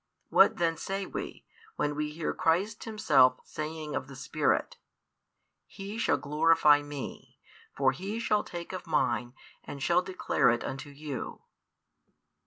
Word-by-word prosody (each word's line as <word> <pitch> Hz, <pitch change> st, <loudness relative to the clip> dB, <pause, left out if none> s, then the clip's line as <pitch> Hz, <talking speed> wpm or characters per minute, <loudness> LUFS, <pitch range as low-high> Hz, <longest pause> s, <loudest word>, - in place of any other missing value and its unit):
What -, -, +5 dB
then 165 Hz, -1 st, +1 dB
say 195 Hz, 0 st, -3 dB
we, -, -, -6 dB, 0.3 s
when 150 Hz, -, 0 dB
we 150 Hz, 0 st, -2 dB
hear 155 Hz, +1 st, -3 dB
Christ 185 Hz, +5 st, 0 dB
himself 135 Hz, -, +4 dB
saying 155 Hz, 0 st, -5 dB
of -, -, -3 dB
the 135 Hz, -, -10 dB
Spirit: 145 Hz, +3 st, 0 dB, 0.9 s
He 200 Hz, +3 st, -7 dB
shall -, -, +2 dB
glorify 150 Hz, 0 st, +4 dB
Me; 145 Hz, -2 st, -8 dB, 0.4 s
for 135 Hz, -1 st, +4 dB
He 195 Hz, +11 st, -5 dB
shall 210 Hz, -2 st, +1 dB
take 175 Hz, +1 st, -7 dB
of 185 Hz, -1 st, -6 dB
Mine 120 Hz, -6 st, 0 dB, 0.3 s
and 140 Hz, -1 st, -7 dB
shall 175 Hz, +1 st, +3 dB
declare 185 Hz, -8 st, +1 dB
it 120 Hz, +1 st, +1 dB
unto 135 Hz, +2 st, -5 dB
you? 145 Hz, -1 st, -6 dB
155 Hz, 140 wpm, -29 LUFS, 140-185 Hz, 0.9 s, What